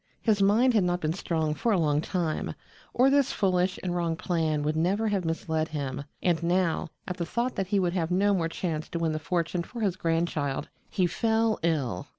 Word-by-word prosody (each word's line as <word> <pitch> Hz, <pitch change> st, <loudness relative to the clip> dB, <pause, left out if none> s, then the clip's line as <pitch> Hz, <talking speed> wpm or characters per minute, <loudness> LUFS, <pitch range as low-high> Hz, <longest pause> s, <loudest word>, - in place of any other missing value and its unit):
His 210 Hz, -3 st, +2 dB
mind 225 Hz, +6 st, +4 dB
had 215 Hz, -4 st, +4 dB
not 175 Hz, 0 st, +1 dB
been 155 Hz, -2 st, -1 dB
strong 160 Hz, -4 st, -1 dB
for 230 Hz, +9 st, 0 dB
a 205 Hz, -, +3 dB
long 150 Hz, -3 st, +2 dB
time, 165 Hz, -2 st, -2 dB, 0.4 s
or 260 Hz, +2 st, +4 dB
this 280 Hz, -1 st, +3 dB
foolish 185 Hz, -2 st, +1 dB
and 180 Hz, -1 st, -1 dB
wrong 170 Hz, -2 st, 0 dB
plan 160 Hz, -3 st, 0 dB
would 155 Hz, +1 st, 0 dB
never 195 Hz, +7 st, +1 dB
have 195 Hz, -4 st, 0 dB
misled 160 Hz, -1 st, -1 dB
him, 140 Hz, -3 st, -4 dB, 0.2 s
and 175 Hz, -2 st, +2 dB
now, 175 Hz, -1 st, +1 dB, 0.2 s
at 180 Hz, -2 st, -4 dB
the 175 Hz, -, -1 dB
thought 240 Hz, +5 st, -1 dB
that 195 Hz, -, -1 dB
he 200 Hz, +1 st, +2 dB
would 175 Hz, -2 st, +1 dB
have 170 Hz, -3 st, -1 dB
no 200 Hz, +3 st, +3 dB
more 165 Hz, -4 st, 0 dB
chance 165 Hz, -2 st, -3 dB
to -, -, -3 dB
win 165 Hz, -1 st, 0 dB
the 155 Hz, -, -2 dB
fortune 170 Hz, +1 st, -1 dB
for 235 Hz, +7 st, -7 dB
his 195 Hz, -4 st, +1 dB
grandchild, 165 Hz, -5 st, -1 dB, 0.2 s
he 185 Hz, -, +1 dB
fell 220 Hz, +5 st, +1 dB
ill. 140 Hz, -, -1 dB
175 Hz, 210 wpm, -27 LUFS, 160-195 Hz, 0.4 s, mind